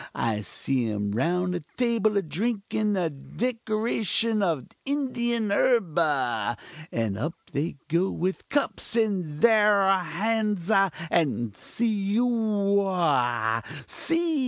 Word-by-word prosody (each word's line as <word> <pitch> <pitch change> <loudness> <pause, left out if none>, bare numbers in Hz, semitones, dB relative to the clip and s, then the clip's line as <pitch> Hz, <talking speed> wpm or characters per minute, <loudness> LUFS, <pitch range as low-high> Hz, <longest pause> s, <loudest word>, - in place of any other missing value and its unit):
I 110 -2 0
see 125 +2 -1
'em 105 -1 -2
round 180 - 0
a 175 - -1 0.2
table 230 -4 +2
a 200 - +1
drinkin 210 +3 -1
a 170 -3 0
decoction 225 - -1
of 165 -9 0 0.2
Indian 240 -6 -1
herb 210 -5 +2
ah! 125 -8 0 0.4
and 110 -3 -1
up 155 +8 -2 0.2
they 145 +2 -2
go 170 +4 +1
with 185 +2 -3
cups 280 -4 0
in 185 -10 0
thar 205 -4 +5
hands 215 -2 -1
ah! 195 -2 +4 0.2
and 120 - +1
see 210 - -1
ohoah! 195 - +1 0.3
see! 330 -2 0
195 Hz, 115 wpm, -26 LUFS, 150-225 Hz, 0.4 s, thar